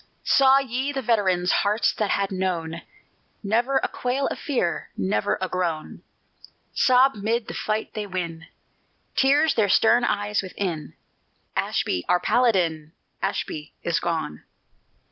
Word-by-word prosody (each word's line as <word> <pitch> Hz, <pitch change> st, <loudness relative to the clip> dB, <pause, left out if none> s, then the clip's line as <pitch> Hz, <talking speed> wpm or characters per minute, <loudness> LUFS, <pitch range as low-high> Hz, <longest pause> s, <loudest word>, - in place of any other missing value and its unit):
_" -, -, -32 dB, 0.2 s
Saw 270 Hz, 0 st, +5 dB
ye 270 Hz, +1 st, -1 dB
the 270 Hz, -2 st, -3 dB
veterans 190 Hz, -6 st, +2 dB
Hearts 205 Hz, +1 st, +2 dB
that 210 Hz, -2 st, -1 dB
had 200 Hz, 0 st, 0 dB
known 170 Hz, -3 st, -2 dB, 0.6 s
Never 235 Hz, +6 st, +1 dB
a -, -, +2 dB
quail 255 Hz, +3 st, -2 dB
of -, -, -5 dB
fear, 240 Hz, -, -1 dB
Never 95 Hz, +2 st, 0 dB
a 185 Hz, -, -1 dB
groan, 175 Hz, -4 st, -3 dB, 0.7 s
Sob 260 Hz, +1 st, +4 dB
'mid 220 Hz, +3 st, -2 dB
the -, -, -6 dB
fight 215 Hz, 0 st, -2 dB
they 210 Hz, -2 st, -4 dB
win, 170 Hz, -4 st, -5 dB, 0.7 s
Tears 290 Hz, +3 st, +4 dB
their 210 Hz, -3 st, +2 dB
stern 240 Hz, +5 st, +4 dB
eyes 205 Hz, -2 st, 0 dB
within, 180 Hz, -5 st, -4 dB, 0.6 s
"Ashby, 90 Hz, -, -1 dB
our 180 Hz, -, +4 dB
Paladin, 175 Hz, -9 st, +1 dB, 0.3 s
Ashby 150 Hz, 0 st, -3 dB
is 170 Hz, -2 st, 0 dB
gone!" 160 Hz, -, -3 dB
200 Hz, 135 wpm, -24 LUFS, 170-240 Hz, 0.7 s, Saw